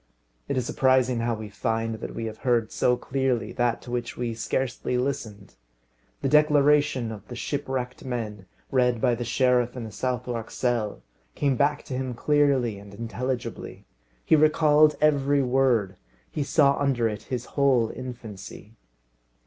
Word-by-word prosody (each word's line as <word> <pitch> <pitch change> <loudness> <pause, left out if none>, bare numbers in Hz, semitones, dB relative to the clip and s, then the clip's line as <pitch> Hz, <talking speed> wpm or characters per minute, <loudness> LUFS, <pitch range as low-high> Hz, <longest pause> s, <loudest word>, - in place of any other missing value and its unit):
It - - -1
is 125 - 0
surprising 130 -2 +2
how 115 0 0
we 110 0 -7
find 115 +3 -2
that - - -7
we 115 - -3
have 110 0 -6
heard 120 -4 +1
so 125 0 +2
clearly 130 -3 -1
that 120 -1 0
to 120 - -9
which 120 -1 -3
we 120 -1 -2
scarcely 125 +2 -2
listened. 115 - -4 0.7
The - - +2
declaration 145 -4 +3
of 105 -2 -9
the 120 - -8
shipwrecked 130 -1 -3
men, 110 -7 -5 0.2
read 125 -2 +2
by 125 +1 +2
the 120 +1 -2
sheriff 125 0 +1
in 120 - -4
the 110 - -7
Southwark 125 -2 -3
cell, 120 -4 -2 0.3
came 140 -2 +1
back 145 +3 +1
to 140 - -7
him 130 -1 -3
clearly 135 -6 +2
and 100 0 -12
intelligibly. 115 +2 -5 0.4
He - - +5
recalled 155 0 +5
every 145 -2 +3
word, 125 -7 +2 0.3
he 150 - -3
saw 140 -1 +3
under 135 -5 +1
it 105 -1 -4
his 125 -2 -3
whole 130 -5 +3
infancy. 115 -4 -9
125 Hz, 155 wpm, -26 LUFS, 115-135 Hz, 0.7 s, He